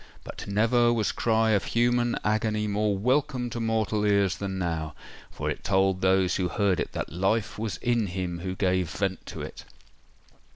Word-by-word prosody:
But - - -8
never 115 +4 +3
was 110 -3 +1
cry 110 -1 +2
of 100 -2 +2
human 120 0 +1
agony 110 0 0
more 105 -1 0
welcome 125 +2 0
to 120 - -4
mortal 110 -2 0
ears 100 -2 +2
than 95 -1 -4
now; 80 -4 -3 0.3
for - - -5
it - - -3
told 95 -1 +2
those 95 -1 +3
who 95 -2 0
heard 100 -1 +1
it - - -3
that - - -4
life 100 +5 0
was 110 -2 -3
in 120 -3 +1
him 90 -1 -3
who 95 +1 -4
gave 95 -3 +1
vent 95 +3 -2
to - - -6
it! - - -8
105 Hz, 175 wpm, -27 LUFS, 95-115 Hz, 0.3 s, never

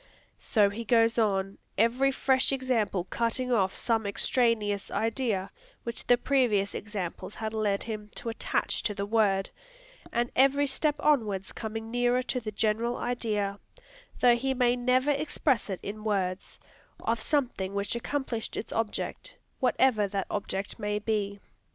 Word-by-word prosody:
So 205 -4 +3
he 225 +3 -5
goes 230 0 +3
on, 195 -2 0 0.2
every 245 +6 +3
fresh 265 0 +2
example 250 -8 0
cutting 235 +5 -1
off 195 -5 +2
some 225 -3 0
extraneous 210 -1 +1
idea 225 -4 -1 0.3
which 235 0 -5
the 245 - +6
previous 240 -7 +2
examples 195 -2 -5
had 220 0 -4
led 210 -2 0
him 215 -2 -6
to 230 - -4
attach 225 - -1
to 210 - -1
the 200 0 -2
word, 200 -3 +2 0.6
and 240 +1 0
every 275 +2 +4
step 295 +2 +2
onward 220 -11 +1
coming 225 0 -5
nearer 245 +1 +2
to 250 - -1
the 215 -3 -5
general 220 +3 0
idea, 210 -5 -1 0.6
though 245 -1 +7
he 265 +2 -1
may 245 -1 +3
never 255 +3 +2
express 285 -4 0
it 190 - -3
in 210 +2 -6
words, 195 -3 -2 0.4
of 230 0 0
something 220 -7 -1
which 200 +2 -1
accomplished 235 -2 -3
its - - -4
object, 225 -2 -3 0.2
whatever 250 -5 +3
that 195 -1 -2
object 200 +1 -3
may 210 -1 -1
be. 205 -1 -1
225 Hz, 145 wpm, -28 LUFS, 205-245 Hz, 0.6 s, though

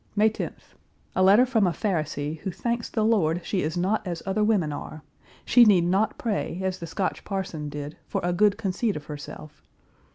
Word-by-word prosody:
May 215 +1 +4
10th. - - -7 0.4
A - - +2
letter 200 +6 +6
from 225 -6 +2
a - - +2
Pharisee 155 -5 -2
who 190 - -4
thanks 235 +5 -2
the 220 -2 0
Lord 175 -7 +2
she 190 - 0
is 160 +4 -2
not 190 +5 +1
as 170 -2 -4
other 200 +2 0
women 195 -9 +2
are; 155 +1 -7 0.4
she 245 - +7
need 195 -6 +5
not 195 +4 +1
pray, 205 -5 -2
as 190 0 -2
the 170 - -6
Scotch 185 +4 -2
parson 190 -7 -4
did, 145 +1 -6
for - - -2
a 175 0 +1
good 205 +2 +3
conceit 210 +1 -1
of 150 - -6
herself. 150 0 -9
190 Hz, 195 wpm, -26 LUFS, 160-215 Hz, 0.4 s, she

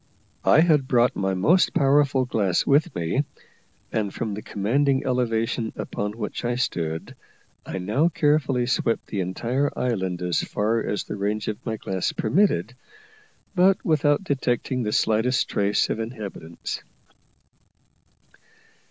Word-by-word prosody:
I 155 - +6
had 155 -6 +3
brought 120 -1 +3
my 95 -1 0
most 165 - +3
powerful 140 -1 +3
glass 100 -7 +1
with 145 +3 +2
me, 85 - 0 0.7
and 105 -3 -1
from 110 0 -3
the 105 - -5
commanding 130 +8 0
elevation 115 -3 0
upon 105 0 -4
which 105 -2 -5
I 120 0 0
stood, 80 -10 -3 0.5
I - - -4
now 110 - +1
carefully 145 -6 +1
swept 120 -2 0
the 100 - -4
entire 120 +10 -1
island 95 -8 -1
as 90 -2 +1
far 110 +3 0
as 105 -2 -2
the - - -6
range 105 +2 -2
of 105 +3 -5
my 110 -1 -2
glass 95 -3 -2
permitted, 135 - +1 0.8
but 190 0 +3
without 150 +1 +2
detecting 130 -4 -1
the 105 -2 -1
slightest 115 +4 +2
trace 100 0 +1
of - - -2
inhabitants. 105 -8 -6
115 Hz, 135 wpm, -24 LUFS, 100-135 Hz, 0.8 s, I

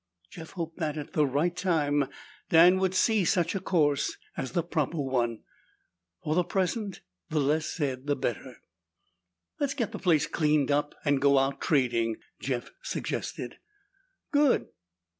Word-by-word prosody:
Jeff 160 -1 -10
hoped 165 -2 -5
that, 155 -2 -2
at 150 - -7
the 150 -5 +3
right 150 +6 0
time, 145 -6 +1 0.4
Dan 175 +3 +7
would 190 -1 0
see 215 +1 +3
such 175 -1 +1
a 195 - -1
course 150 -7 +1 0.2
as 130 -2 -4
the 170 - +1
proper 165 -2 -1
one. 120 -5 -1 0.8
For 150 - 0
the 180 +2 +3
present, 190 +2 -2 0.3
the 155 - 0
less 150 +3 +1
said 135 -4 -3
the 145 - +2
better. 125 0 -3 1.0
"Let's 285 -1 0
get 235 -7 -1
the - - -6
place 170 -5 +3
cleaned 150 -3 +1
up 145 +1 0
and 145 -2 +2
go 140 0 +5
out 135 +1 +1
trading," 120 -6 +1 0.2
Jeff 125 -3 -3
suggested. - - -4 0.7
"Good!" 290 -3 +3
155 Hz, 150 wpm, -28 LUFS, 140-180 Hz, 1.0 s, Dan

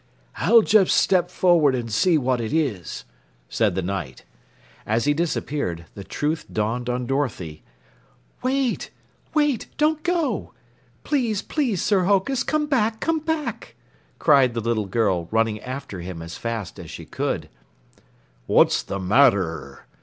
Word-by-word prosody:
"I'll 230 -1 +5
just 205 -3 +4
step 180 -2 +3
forward 170 -7 +3
and 115 -3 -4
see 170 +9 +3
what 130 -3 0
it 110 - -3
is," 130 - -2 0.4
said 105 -6 +1
the 95 - -1
Knight. 90 -8 -5 0.6
As 115 +3 0
he 145 - +3
disappeared, 145 - -2
the 100 - -8
truth 150 +9 -2
dawned 115 +3 -1
on 125 0 -1
Dorothy. 115 - -2 0.8
"Wait! 260 -1 0 0.5
Wait! 295 -6 +1
Don't 310 +1 +2
go! 335 - -1 0.5
Please, 240 -9 0
please, 250 - -1
Sir 195 -4 +2
Hokus, 205 +7 +2
come 305 -1 0
back, 230 -6 +1
come 325 +4 0
back!" 315 -1 -4 0.4
cried 135 -6 +4
the - - 0
little 110 -2 -1
girl, 95 -5 0
running 110 -1 +1
after 130 -6 -6
him 85 -2 -7
as 85 0 -8
fast 115 -5 -5
as - - -9
she - - -8
could. - - -3 1.0
"What's - - +4
the 100 - -5
matter?" 100 -4 +2
140 Hz, 140 wpm, -23 LUFS, -, 1.0 s, I'll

